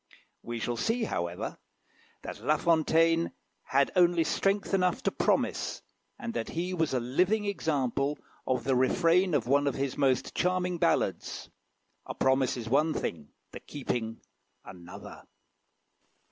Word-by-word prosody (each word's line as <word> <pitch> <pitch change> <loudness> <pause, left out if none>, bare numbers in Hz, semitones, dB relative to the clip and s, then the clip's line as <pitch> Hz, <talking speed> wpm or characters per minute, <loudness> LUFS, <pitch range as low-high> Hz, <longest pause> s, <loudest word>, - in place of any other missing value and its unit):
We 120 0 -5
shall 120 +1 -2
see, 225 - 0
however, 85 - -3 0.6
that - - -7
La 155 +1 +3
Fontaine 165 0 +3 0.3
had 140 +1 +2
only 175 -2 +4
strength 195 +4 0
enough 185 +6 +1
to - - +1
promise, - - 0 0.3
and 240 -3 -5
that - - -3
he 180 +3 -3
was 160 -6 0
a - - +2
living 180 - +1
example 145 - -1 0.3
of 125 -2 0
the 130 +1 +1
refrain 170 +6 +3
of 130 - +1
one 140 +3 +3
of 140 - 0
his 140 0 -2
most 135 -2 +1
charming 180 -1 0
ballads 170 - 0 0.6
"A - - -5
promise 130 -1 +2
is 115 -2 -6
one 150 +6 +2
thing 75 -3 -4 0.2
the - - -8
keeping 120 -5 -4 0.4
another." 90 -1 -11
150 Hz, 140 wpm, -29 LUFS, 130-180 Hz, 0.6 s, only